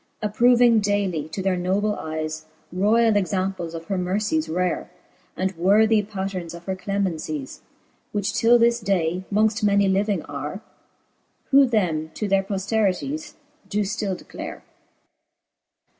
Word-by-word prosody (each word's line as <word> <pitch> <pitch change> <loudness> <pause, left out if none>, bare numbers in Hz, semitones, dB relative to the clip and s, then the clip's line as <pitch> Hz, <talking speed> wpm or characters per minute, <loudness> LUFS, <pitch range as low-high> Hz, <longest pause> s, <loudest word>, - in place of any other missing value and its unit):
Approving 235 +2 +4
dayly 200 -7 -1
to 190 +4 -4
their 190 -1 +1
noble 195 +4 0
eyes 155 -2 -5 0.3
Royall 215 +4 +3
examples 185 -3 -1
of 165 0 -7
her 190 +1 -2
mercies 180 -4 -1
rare, 180 +1 -1 0.5
And 190 +1 -1
worthie 210 +5 +4
patterns 190 -4 -5
of 170 - -11
her 190 - -2
clemencies 170 -8 -3 0.3
\ - - -41
Which 205 0 -1
till 230 +3 +5
this 235 0 +3
day 185 -3 0
mongft 215 +1 +2
many 200 -1 +4
living 195 -2 +1
are, 145 +8 -6 0.9
Who 275 0 +7
them 170 -9 0
to 210 - -2
their 195 0 +3
pofterities 215 - -1 0.3
doe 210 - 0
ftill 200 -2 -2
declare. - - -8
195 Hz, 130 wpm, -23 LUFS, 180-210 Hz, 0.9 s, Who